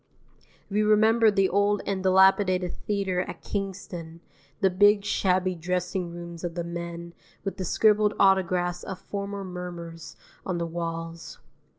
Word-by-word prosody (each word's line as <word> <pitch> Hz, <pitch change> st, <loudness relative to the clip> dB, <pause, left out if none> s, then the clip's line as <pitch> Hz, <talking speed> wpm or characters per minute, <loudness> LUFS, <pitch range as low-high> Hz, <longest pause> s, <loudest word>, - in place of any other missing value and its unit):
We 210 Hz, +1 st, 0 dB
remember 220 Hz, +2 st, +5 dB
the 195 Hz, -2 st, +3 dB
old 205 Hz, +2 st, +1 dB
and 195 Hz, -1 st, -2 dB
dilapidated 190 Hz, -1 st, +4 dB
theatre 195 Hz, -3 st, 0 dB
at -, -, -7 dB
Kingston, 180 Hz, -4 st, -5 dB, 0.4 s
the 190 Hz, -2 st, +3 dB
big 205 Hz, +2 st, +4 dB
shabby 185 Hz, -2 st, +1 dB
dressing 180 Hz, +1 st, -2 dB
rooms 170 Hz, 0 st, -8 dB
of 170 Hz, -1 st, -4 dB
the 170 Hz, -, -2 dB
men, 170 Hz, 0 st, -6 dB, 0.3 s
with 195 Hz, -, -4 dB
the 185 Hz, -, -3 dB
scribbled 210 Hz, +2 st, +3 dB
autographs 180 Hz, -2 st, +2 dB
of 190 Hz, -, -6 dB
former 200 Hz, +1 st, -5 dB
mummers 175 Hz, -3 st, -7 dB, 0.3 s
on 185 Hz, -2 st, -2 dB
the 170 Hz, -, -1 dB
walls. 165 Hz, 0 st, -5 dB
185 Hz, 135 wpm, -26 LUFS, 170-200 Hz, 0.4 s, remember